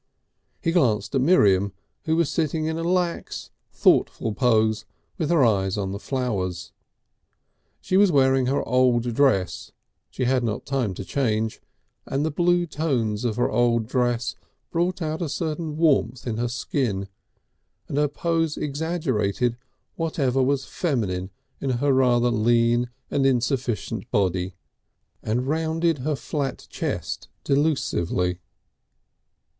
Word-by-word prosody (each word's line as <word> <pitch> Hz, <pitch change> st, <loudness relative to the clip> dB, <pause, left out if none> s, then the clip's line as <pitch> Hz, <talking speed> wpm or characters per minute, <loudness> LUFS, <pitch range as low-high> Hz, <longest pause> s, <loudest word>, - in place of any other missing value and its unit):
He 165 Hz, -, +2 dB
glanced 130 Hz, -, +1 dB
at 135 Hz, -, +2 dB
Miriam, 100 Hz, -, +4 dB, 0.3 s
who 160 Hz, 0 st, +2 dB
was 165 Hz, -2 st, +2 dB
sitting 155 Hz, 0 st, 0 dB
in 160 Hz, 0 st, -1 dB
a -, -, -2 dB
lax, 175 Hz, 0 st, -1 dB, 0.2 s
thoughtful 110 Hz, -, +2 dB
pose 110 Hz, -3 st, +2 dB, 0.4 s
with 155 Hz, -, 0 dB
her 165 Hz, -7 st, +4 dB
eyes 95 Hz, -3 st, +1 dB
on 95 Hz, -2 st, -2 dB
the 100 Hz, -, -5 dB
flowers. 100 Hz, -10 st, -3 dB, 1.1 s
She 185 Hz, -, +1 dB
was 200 Hz, -2 st, +5 dB
wearing 130 Hz, -3 st, +3 dB
her 135 Hz, +2 st, 0 dB
old 125 Hz, -2 st, +2 dB
dress, 110 Hz, -9 st, +1 dB, 0.4 s
she 130 Hz, -, -3 dB
had 125 Hz, 0 st, +2 dB
not 110 Hz, -3 st, -1 dB
had -, -, -41 dB
time 130 Hz, -8 st, -1 dB
to 95 Hz, -, -6 dB
change, 110 Hz, -4 st, -1 dB, 0.5 s
and 140 Hz, +3 st, -1 dB
the 160 Hz, -, 0 dB
blue 175 Hz, +2 st, +2 dB
tones 125 Hz, -10 st, -1 dB
of 115 Hz, -3 st, 0 dB
her 120 Hz, -, +1 dB
old 115 Hz, 0 st, +2 dB
dress 120 Hz, -1 st, 0 dB, 0.4 s
brought 175 Hz, +1 st, 0 dB
out 155 Hz, +1 st, -3 dB
a 165 Hz, -, -2 dB
certain 155 Hz, 0 st, -3 dB
warmth 135 Hz, -7 st, +2 dB
in 115 Hz, -3 st, -2 dB
her 120 Hz, +1 st, 0 dB
skin, 120 Hz, -5 st, -2 dB, 0.8 s
and -, -, -4 dB
her 150 Hz, -, +3 dB
pose 165 Hz, +1 st, -1 dB
exaggerated 135 Hz, -, -1 dB, 0.4 s
whatever 140 Hz, -6 st, 0 dB
was 135 Hz, +1 st, +1 dB
feminine 100 Hz, -, -2 dB, 0.3 s
in 135 Hz, -, -2 dB
her 140 Hz, +2 st, +2 dB
rather 125 Hz, -2 st, +3 dB
lean 120 Hz, +1 st, +2 dB, 0.2 s
and 135 Hz, -1 st, +2 dB
insufficient 120 Hz, -3 st, -1 dB
body, 95 Hz, -4 st, 0 dB, 0.7 s
and 120 Hz, +4 st, -1 dB
rounded 160 Hz, +1 st, 0 dB
her 150 Hz, +4 st, -1 dB
flat 135 Hz, +1 st, -4 dB
chest -, -, -3 dB, 0.2 s
delusively. 90 Hz, -, 0 dB
130 Hz, 135 wpm, -24 LUFS, 110-155 Hz, 1.1 s, was